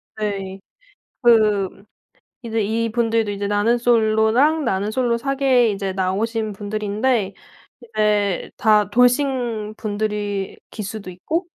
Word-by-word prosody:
네. 195 -3 -4 0.6
그 210 -5 +3 0.6
이제 225 -2 -1
이 225 +2 -1
분들도 225 -1 +1
이제 200 0 -3
나는 205 +4 +2
솔로랑 235 +6 +3
나는 195 0 -1
솔로 235 0 0
사계에 265 -2 +2
이제 195 -1 -3
나오신 210 +4 -1
분들인데 210 +1 -1 0.5
이제 210 -4 0
다 210 -2 +3
돌싱 245 -3 +1
분들이 205 -2 -3
기수도 210 -2 -6
있고 315 - -3
215 Hz, 230 characters per minute, -21 LUFS, 205-235 Hz, 0.6 s, 그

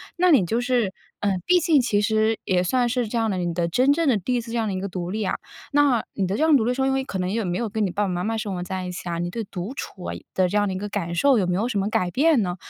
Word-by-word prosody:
那 365 0 +3
你 260 - +5
就 230 +7 0
是 245 -6 0 0.3
嗯， 195 -3 0
毕 360 - +5
竟 315 -4 +4
其 210 -4 +1
实 220 +1 +2
也 180 -1 +2
算 245 +7 +1
是 245 -1 0
这 235 +2 -3
样 225 -1 +1
的， 190 - -2
你 175 -1 -1
的 170 0 0
真 255 +11 +3
正 325 +2 +1
的 260 - +4
第 250 +7 -1
一 - - +1
次 230 0 -9
这 235 - -2
样 225 -2 0
的 200 - -2
一 - - -2
个 195 - -3
独 180 -2 -5
立 215 +3 -2
啊。 190 - -1 0.4
那， 285 -5 +3
你 195 -3 -1
的 195 +3 -1
这 - - +1
样 315 -2 +5
独 250 - +3
立 245 - +1
说， 265 +1 0
因 270 - +2
为 270 0 0
可 200 - -5
能 180 0 -1
也 225 +1 -1
没 180 -2 -2
有 235 - -1
跟 215 +1 -2
你 - - -1
爸 205 +4 -1
爸 - - 0
妈 180 0 -2
妈 225 +2 -1
生 205 -3 -3
活 180 - -4
在 185 +1 -4
一 180 - -4
起 180 0 -6
啊， 170 - -2
你 175 +1 -2
对 230 - -3
独 190 +7 -6
处 190 -9 -7
啊 - - -4 0.2
的 185 -1 +3
这 205 - -3
样 205 0 +2
的 190 - -2
一 - - -3
个 205 +2 -4
感 180 -5 -3
受， 270 +7 +4
有 185 - 0
没 180 - 0
有 215 +6 0
什 210 -5 -1
么 195 +2 0
改 180 -4 0
变 290 - +3
呢？ 180 -3 -2
210 Hz, 375 characters per minute, -24 LUFS, 185-245 Hz, 0.4 s, 你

